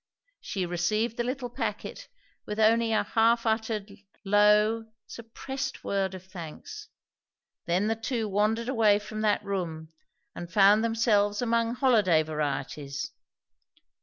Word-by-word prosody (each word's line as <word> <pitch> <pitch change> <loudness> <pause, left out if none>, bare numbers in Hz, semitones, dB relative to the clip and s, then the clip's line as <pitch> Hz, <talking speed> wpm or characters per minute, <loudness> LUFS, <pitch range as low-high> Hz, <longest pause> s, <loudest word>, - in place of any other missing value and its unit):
She 190 -3 -3
received 210 +7 -1
the 240 - 0
little 250 0 -4
packet - - -5 0.4
with 210 +1 -4
only 225 +1 +3
a 220 - +2
half 230 +1 +2
uttered, 220 -2 -1 0.3
low, 210 +2 +4 0.2
suppressed 265 +4 -6
word 195 -1 -1
of 185 0 -11
thanks. 190 - -9 0.8
Then 180 +4 +1
the 225 +1 +1
two 225 0 -3
wandered 215 +3 0
away 225 -5 +4
from 215 +1 -6
that 210 -1 +1
room, 165 -5 -4 0.4
and 175 0 -8
found 205 +1 +5
themselves 215 -3 +2
among 230 -1 0
holiday 210 - +3
varieties. 145 -2 -4
215 Hz, 125 wpm, -27 LUFS, 190-230 Hz, 0.8 s, found